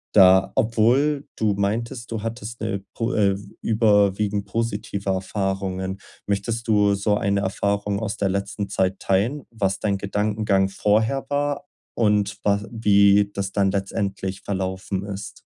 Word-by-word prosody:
da 95 Hz, -1 st, +7 dB
obwohl 125 Hz, +6 st, +2 dB
du 105 Hz, -2 st, +2 dB
meintest, 115 Hz, +5 st, -2 dB
du 110 Hz, -2 st, -3 dB
hattest 115 Hz, 0 st, -6 dB
'ne 100 Hz, 0 st, -2 dB
po, 115 Hz, +2 st, -1 dB
äh, 100 Hz, -2 st, +3 dB, 0.3 s
überwiegend 105 Hz, -2 st, +2 dB
positive 100 Hz, -3 st, -3 dB
Erfahrungen. 95 Hz, 0 st, -2 dB, 0.3 s
Möchtest 115 Hz, +4 st, -2 dB
du 105 Hz, -2 st, +4 dB
so 105 Hz, +1 st, +1 dB
eine 100 Hz, 0 st, +1 dB
Erfahrung 100 Hz, +1 st, -1 dB
aus 110 Hz, -2 st, -3 dB
der 100 Hz, -1 st, 0 dB
letzten 100 Hz, +1 st, -3 dB
Zeit 95 Hz, -1 st, 0 dB
teilen? 115 Hz, +10 st, 0 dB
Was 100 Hz, -4 st, -1 dB
dein 100 Hz, -2 st, 0 dB
Gedankengang 100 Hz, -1 st, 0 dB
vorher 110 Hz, +7 st, +1 dB
war 145 Hz, +4 st, -1 dB, 0.3 s
und 105 Hz, -2 st, +1 dB
was 100 Hz, 0 st, +2 dB
wie 100 Hz, -2 st, +4 dB
das 100 Hz, 0 st, -3 dB
dann 100 Hz, -1 st, +2 dB
letztendlich 95 Hz, -1 st, -3 dB
verlaufen 95 Hz, 0 st, -3 dB
ist? 100 Hz, 0 st, -7 dB
100 Hz, 135 wpm, -23 LUFS, 95-110 Hz, 0.3 s, da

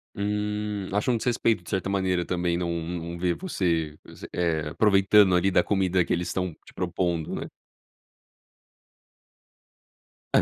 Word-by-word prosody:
Hum, 105 Hz, -1 st, -2 dB
acham 105 Hz, +5 st, +1 dB
um 115 Hz, -, +1 dB
desrespeito, 115 Hz, -5 st, +1 dB
de -, -, -11 dB
certa 95 Hz, -1 st, -1 dB
maneira, 95 Hz, -3 st, 0 dB
também 85 Hz, -1 st, 0 dB
não 85 Hz, -1 st, -2 dB
não 85 Hz, 0 st, -5 dB
ver 90 Hz, -1 st, +1 dB
você 85 Hz, -, -1 dB
você, -, -, -11 dB
eh, 80 Hz, -3 st, 0 dB
aproveitando 100 Hz, 0 st, +5 dB
ali 95 Hz, +2 st, +3 dB
da 90 Hz, -, +4 dB
comida 95 Hz, -2 st, +2 dB
que -, -, -7 dB
eles 90 Hz, 0 st, 0 dB
estão 90 Hz, -1 st, -2 dB
te -, -, -16 dB
propondo, 85 Hz, -3 st, -2 dB
né? -, -, -5 dB, 2.8 s
Hã. -, -, +6 dB
90 Hz, 145 wpm, -26 LUFS, 85-105 Hz, 2.8 s, Hã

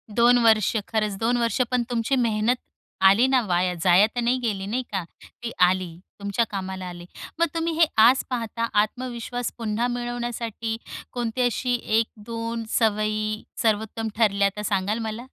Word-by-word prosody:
2 240 Hz, +1 st, +6 dB
वर्ष 220 Hz, -1 st, +4 dB
खरंच. 215 Hz, -2 st, 0 dB
2 240 Hz, +2 st, +1 dB
वर्ष 235 Hz, +2 st, +1 dB
पण 250 Hz, -1 st, +2 dB
तुमची 240 Hz, +3 st, 0 dB
मेहनत 230 Hz, 0 st, +2 dB, 0.5 s
आली 200 Hz, +6 st, +6 dB
ना 260 Hz, -1 st, +3 dB
वाया 180 Hz, 0 st, +1 dB
जाया 185 Hz, +3 st, +6 dB
तर 245 Hz, -, 0 dB
नाही 245 Hz, +2 st, +2 dB
गेली, 205 Hz, -5 st, -2 dB
नाही 245 Hz, +5 st, -2 dB
का? 190 Hz, -3 st, -1 dB, 0.4 s
ती 230 Hz, -, -3 dB
आली, 180 Hz, -2 st, +2 dB, 0.2 s
तुमच्या 200 Hz, +3 st, 0 dB
कामाला 190 Hz, -1 st, -5 dB
आली. 175 Hz, 0 st, -9 dB, 0.3 s
मग 335 Hz, -, +5 dB
तुम्ही 330 Hz, 0 st, 0 dB
हे 330 Hz, -, +7 dB, 0.2 s
आज 250 Hz, +3 st, +6 dB
पाहता, 230 Hz, -1 st, -2 dB
आत्मविश्वास 245 Hz, +1 st, -4 dB
पुन्हा 230 Hz, +1 st, -1 dB
मिळवण्यासाठी, 240 Hz, -2 st, -3 dB, 0.3 s
कोणती 240 Hz, 0 st, -2 dB
अशी 245 Hz, +1 st, +1 dB
एक 240 Hz, -, -2 dB
1-2 230 Hz, +1 st, -3 dB, 0.2 s
सवयी 215 Hz, 0 st, 0 dB, 0.2 s
सर्वोत्तम 220 Hz, 0 st, 0 dB
ठरल्या, 200 Hz, -3 st, +3 dB
त्या 210 Hz, -, -5 dB
सांगाल 205 Hz, +2 st, 0 dB
मला? 230 Hz, +3 st, -6 dB
225 Hz, 155 wpm, -24 LUFS, 205-240 Hz, 0.5 s, हे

